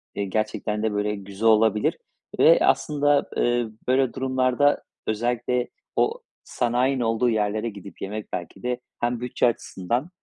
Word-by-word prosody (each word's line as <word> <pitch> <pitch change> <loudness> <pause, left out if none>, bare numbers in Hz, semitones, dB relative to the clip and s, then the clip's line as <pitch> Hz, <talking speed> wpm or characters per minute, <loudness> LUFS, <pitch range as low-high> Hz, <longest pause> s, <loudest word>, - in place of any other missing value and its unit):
eee, 100 - -1
gerçekten 105 +1 -2
de 110 -1 0
böyle 105 +1 0
güzel 100 +2 -3
olabilir 110 -1 +3 0.4
ve - - +7
aslında, 145 -1 +2
eee, 120 -1 +1 0.2
böyle 130 0 +2
durumlarda 130 +2 +2 0.2
özellikle 120 +2 0 0.3
o 465 +3 +1 0.2
sanayinin 125 +2 0
olduğu 115 +1 +2
yerlere 110 0 0
gidip 100 -3 -11
yemek 105 +2 -5
belki 90 +1 -6
de 125 0 -1 0.2
hem 120 0 0
bütçe 125 - 0
açısından 120 - -2
115 Hz, 135 wpm, -24 LUFS, 105-125 Hz, 0.4 s, ve